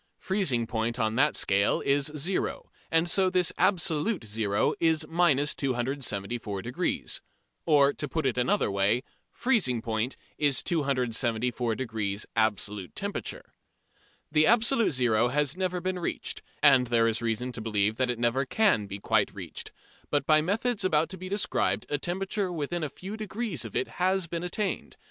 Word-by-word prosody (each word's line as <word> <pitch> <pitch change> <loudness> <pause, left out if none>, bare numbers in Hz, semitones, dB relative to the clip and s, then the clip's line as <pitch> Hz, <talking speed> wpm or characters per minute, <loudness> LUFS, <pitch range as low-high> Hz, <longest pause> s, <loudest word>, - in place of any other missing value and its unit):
Freezing 170 - 0
point 115 +1 -2
on 110 -3 0
that 145 +6 +3
scale 100 +1 +2
is 140 +2 +1
"zero," 180 +6 -2 0.2
and 165 +1 +3
so 185 +2 +3
this 180 -2 +1
absolute 175 - +1
zero 105 -1 0
is 160 -1 +2
minus 155 -4 +2
274°. 120 -4 -2 0.5
Or, 145 -3 +5
to 150 - -3
put 160 +1 -2
it 130 - +1
another 125 - +1
way, 100 +6 +2 0.3
freezing 210 - +1
point 115 +2 -2 0.2
is 145 -3 +2
274° 120 - -1
absolute 105 -3 -1
temperature. - - -4 0.8
The 155 0 +4
absolute 230 - +3
zero 120 -3 +3
has 145 +3 0
never 185 -1 -1
been 185 +1 -2
reached, 175 - -3 0.2
and 135 -4 +6
there 115 -1 +3
is 115 +1 0
reason 115 +2 -1
to 120 - -6
believe 105 -1 0
that 130 -1 +1
it 120 - -1
never 120 +3 +1
can 130 - +2
be 100 0 -5
quite 100 - +1
reached, - - -6 0.4
but 145 -2 +1
by 155 0 +5
methods 210 +5 0
about 160 -3 +2
to 190 - -7
be 185 +1 -6
described 110 - 0
a 145 - 0
temperature 190 +3 -2
within 170 +1 -3
a 150 - -2
few 190 +8 -8
degrees 215 - -3
of 115 - -8
it 130 - 0
has 185 0 +2
been 170 0 -4
attained. 190 +3 -3
140 Hz, 155 wpm, -28 LUFS, 115-175 Hz, 0.8 s, and